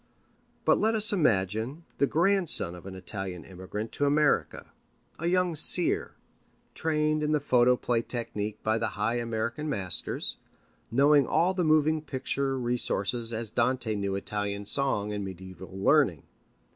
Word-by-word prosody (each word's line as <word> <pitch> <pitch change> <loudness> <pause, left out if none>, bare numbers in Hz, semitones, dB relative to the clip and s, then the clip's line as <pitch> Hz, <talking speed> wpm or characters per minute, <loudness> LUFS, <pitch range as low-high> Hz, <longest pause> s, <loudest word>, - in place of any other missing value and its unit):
But - - +4
let 220 +1 +2
us 215 -1 +4
imagine 115 - 0
the 140 - +3
grandson 175 - +2
of 90 +1 -11
an 95 - -8
Italian 95 -1 -5
immigrant 95 +4 -7
to 145 - 0
America, 145 +1 +1 0.5
a 170 - -2
young 180 -1 +2
seer, 165 +3 +4 0.6
trained 155 -1 0
in 150 0 0
the 150 - +2
photoplay 125 -3 +2
technique 110 -3 -3
by 110 +1 +1
the 115 - -1
high 115 +4 0
American 115 +6 -3
masters, 95 - -2 0.5
knowing 140 +2 +4
all 180 +3 +2
the 185 -1 -1
moving 155 0 +3
picture 135 -1 -2
resources 120 -2 -2
as 115 -1 -4
Dante 120 -1 0
knew 100 -1 -2
Italian 100 0 -3
song 105 -4 0
and 105 -1 -3
mediæval 95 -1 -9
learning. 95 - +2
120 Hz, 140 wpm, -28 LUFS, 100-150 Hz, 0.6 s, But